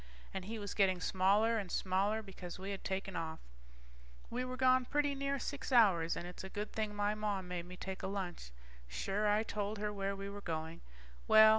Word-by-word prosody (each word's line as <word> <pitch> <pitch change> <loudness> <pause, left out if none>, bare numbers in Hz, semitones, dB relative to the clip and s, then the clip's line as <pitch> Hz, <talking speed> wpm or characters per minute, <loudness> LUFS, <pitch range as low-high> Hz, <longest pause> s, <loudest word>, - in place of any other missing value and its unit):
And 190 -1 -3
he 225 +3 -4
was 205 -3 -4
getting 190 -3 +3
smaller 200 +6 +3
and 190 -4 -5
smaller, 200 +4 +1
because 185 -3 -8
we 190 +2 -4
had 195 - -5
taken 195 0 -2
off. 160 -1 -2 0.9
We 250 +2 -1
were 255 0 -4
gone 255 -1 +5
pretty 290 +1 +1
near 275 0 0
six 280 +2 -4
hours, 185 -9 +5
and - - -4
it's 180 +1 -7
a 190 - -6
good 205 +2 -4
thing 215 -1 -1
my 205 0 +2
Mom 205 -3 -1
made 175 -1 -4
me 180 0 -9
take 190 0 -5
a - - -2
lunch. 190 - -4 0.4
Sure, 195 - 0
I 210 +1 +4
told 210 -1 -2
her 210 0 -2
where 195 0 -1
we 195 0 -5
were 200 0 -6
going. 160 -1 -4 0.5
Well 220 0 +9
200 Hz, 205 wpm, -36 LUFS, 185-220 Hz, 0.9 s, Well